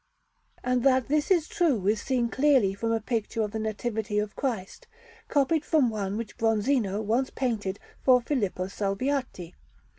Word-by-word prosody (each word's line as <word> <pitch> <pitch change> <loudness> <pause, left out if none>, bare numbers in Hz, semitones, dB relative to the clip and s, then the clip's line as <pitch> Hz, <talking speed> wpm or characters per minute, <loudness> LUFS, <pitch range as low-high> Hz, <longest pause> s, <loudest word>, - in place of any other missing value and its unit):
And 250 0 +1
that 260 -2 +3
this 300 0 +1
is 345 -5 +3
true 330 - +1
is 210 +2 +2
seen 250 -3 0
clearly 265 -8 +3
from 225 +3 -2
a 225 - +1
picture 225 0 -2
of 210 - -3
the 220 - -3
Nativity 220 0 -2
of 210 0 -1
Christ, 225 -9 -4 0.4
copied 290 +2 +2
from 290 -8 +2
one 200 -1 -3
which 230 -2 -7
Bronzino 225 -2 +1
once 235 +5 +1
painted 215 -7 -2 0.2
for 255 -1 +5
Filippo 225 -8 -1
Salviati. 200 -1 -2
230 Hz, 155 wpm, -27 LUFS, 210-265 Hz, 0.4 s, for